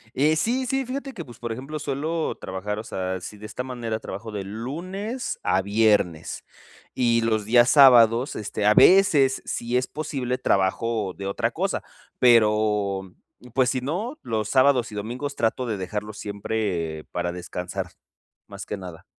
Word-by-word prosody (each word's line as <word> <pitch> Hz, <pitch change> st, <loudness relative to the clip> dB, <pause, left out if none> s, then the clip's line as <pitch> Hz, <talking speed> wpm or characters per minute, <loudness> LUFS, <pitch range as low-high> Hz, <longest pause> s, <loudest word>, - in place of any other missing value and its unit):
Eh, 150 Hz, +4 st, +3 dB
sí, 245 Hz, +9 st, 0 dB
sí. 270 Hz, 0 st, 0 dB
Fíjate 270 Hz, +2 st, -5 dB
que 175 Hz, -9 st, -7 dB
pues 120 Hz, -3 st, -13 dB
por 120 Hz, -1 st, -4 dB
ejemplo, 135 Hz, +6 st, -5 dB
suelo 155 Hz, +4 st, -2 dB
trabajar 95 Hz, +2 st, -5 dB
o 110 Hz, -, -5 dB
sea, 95 Hz, -2 st, -3 dB
si 105 Hz, +3 st, -9 dB
de 105 Hz, +1 st, -9 dB
esta 125 Hz, -, -5 dB
manera 120 Hz, -4 st, -4 dB
trabajo 110 Hz, +3 st, -7 dB
de 100 Hz, -2 st, -4 dB
lunes 180 Hz, -, -5 dB
a 95 Hz, 0 st, +1 dB
viernes, 105 Hz, -5 st, +1 dB, 0.5 s
y 120 Hz, -2 st, +2 dB
los 110 Hz, -2 st, 0 dB
días 120 Hz, +3 st, +5 dB
sábados, 125 Hz, -3 st, +6 dB
este, 105 Hz, 0 st, -2 dB
a 105 Hz, -, +5 dB
veces 165 Hz, -9 st, +5 dB
si 120 Hz, +1 st, -3 dB
es 125 Hz, +1 st, +1 dB
posible, 135 Hz, -5 st, -3 dB
trabajo 100 Hz, +1 st, 0 dB
de 100 Hz, -, -6 dB
otra 100 Hz, -, 0 dB
cosa, -, -, -2 dB, 0.4 s
pero, 105 Hz, -5 st, +3 dB, 0.4 s
pues 130 Hz, -1 st, +3 dB
si 130 Hz, -2 st, -2 dB
no, 205 Hz, -, -3 dB
los 110 Hz, -3 st, -2 dB
sábados 130 Hz, -3 st, +3 dB
y -, -, -8 dB
domingos 125 Hz, +7 st, -4 dB
trato 120 Hz, +2 st, 0 dB
de 110 Hz, -4 st, -2 dB
dejarlo 105 Hz, +3 st, -4 dB
siempre 100 Hz, -6 st, -3 dB
para 85 Hz, 0 st, -2 dB
descansar 90 Hz, +1 st, -5 dB, 0.6 s
más -, -, -8 dB
que 105 Hz, -, -4 dB
nada. 90 Hz, -4 st, -10 dB
115 Hz, 165 wpm, -24 LUFS, 100-135 Hz, 0.6 s, sábados